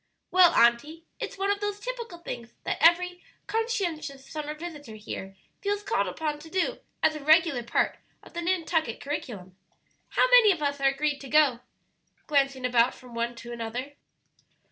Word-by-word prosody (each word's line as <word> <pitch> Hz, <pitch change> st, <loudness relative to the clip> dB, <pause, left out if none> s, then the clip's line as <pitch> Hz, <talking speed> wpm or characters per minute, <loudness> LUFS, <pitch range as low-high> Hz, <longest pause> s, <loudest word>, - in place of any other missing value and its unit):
"Well, 365 Hz, -2 st, +7 dB
auntie, 285 Hz, +8 st, +3 dB
it's -, -, -5 dB
one 395 Hz, +1 st, +1 dB
of 405 Hz, -, -1 dB
those 415 Hz, 0 st, -3 dB
typical 470 Hz, -5 st, -6 dB
things 240 Hz, -8 st, -8 dB
that -, -, -2 dB
every 355 Hz, +1 st, +4 dB, 0.2 s
conscientious 350 Hz, -, -2 dB
summer 300 Hz, -1 st, -5 dB
visitor 300 Hz, -8 st, -8 dB
here 195 Hz, -2 st, -7 dB, 0.3 s
feels 410 Hz, 0 st, -1 dB
called -, -, 0 dB
upon 300 Hz, -2 st, -3 dB
to 320 Hz, +2 st, -12 dB
do 380 Hz, +8 st, -1 dB, 0.2 s
as 315 Hz, -, +4 dB
a 300 Hz, -, -7 dB
regular 315 Hz, -3 st, +4 dB
part 235 Hz, 0 st, 0 dB, 0.2 s
of -, -, -16 dB
the 345 Hz, -, -3 dB
Nantucket 335 Hz, -7 st, 0 dB
curriculum. 210 Hz, -10 st, -6 dB, 0.5 s
How -, -, +3 dB
many 480 Hz, -4 st, +8 dB
of 335 Hz, -5 st, -2 dB
us 285 Hz, -1 st, -1 dB
are 275 Hz, -, +4 dB
agreed 285 Hz, +1 st, -1 dB
to 270 Hz, -, -9 dB
go?" 285 Hz, -5 st, +4 dB, 0.7 s
glancing 275 Hz, -3 st, +1 dB
about 245 Hz, 0 st, +3 dB
from 250 Hz, -2 st, -14 dB
one 235 Hz, +1 st, -2 dB
to 235 Hz, +1 st, -9 dB
another. 240 Hz, +4 st, -5 dB
300 Hz, 165 wpm, -27 LUFS, 250-355 Hz, 0.7 s, many